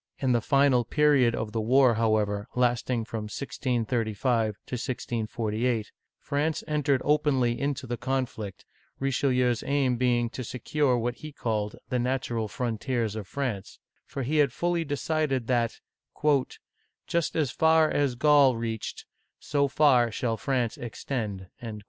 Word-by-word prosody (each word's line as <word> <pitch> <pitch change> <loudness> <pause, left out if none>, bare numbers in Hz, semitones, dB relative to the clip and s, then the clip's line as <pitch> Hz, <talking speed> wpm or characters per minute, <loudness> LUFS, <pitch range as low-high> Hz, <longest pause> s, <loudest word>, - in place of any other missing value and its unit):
In 130 -2 0
the 120 -1 +3
final 135 -1 +3
period 135 -2 +3
of 110 -2 -3
the 110 0 -1
war, 125 +2 +5
however, 110 -2 +1
lasting 120 -1 +1
from 110 -1 -5
1635 115 -2 -1
to - - -11
1648, 115 -2 -2 0.3
France 150 +3 -1
entered 145 -3 +1
openly 140 -5 +2
into 140 -2 -2
the 120 -1 -3
conflict, 120 -7 -3 0.3
Richelieu's 125 -3 +1
aim 135 -3 +1
being 120 -1 +2
to 130 - -5
secure 130 +2 0
what 120 +1 -2
he 155 -1 -8
called 105 -6 -2
" - - -45
the 125 - 0
natural 120 -3 -1
frontiers 115 -1 -2
of 105 -3 -6
France 125 -8 -4 0.2
"; - - -45
for 135 - -4
he 150 +5 0
had 145 -3 +4
fully 175 +4 0
decided 145 -3 -1
that, 120 -2 0 1.3
"Just 170 -1 -1
as 150 -6 +1
far 160 0 +4
as 140 -4 0
Gaul 140 -1 +5
reached, 115 -1 -4 0.3
so 140 0 0
far 130 -5 +4
shall 115 +1 -1
France 120 -1 -1
extend!" 110 -5 -4
125 Hz, 140 wpm, -27 LUFS, 115-140 Hz, 1.3 s, war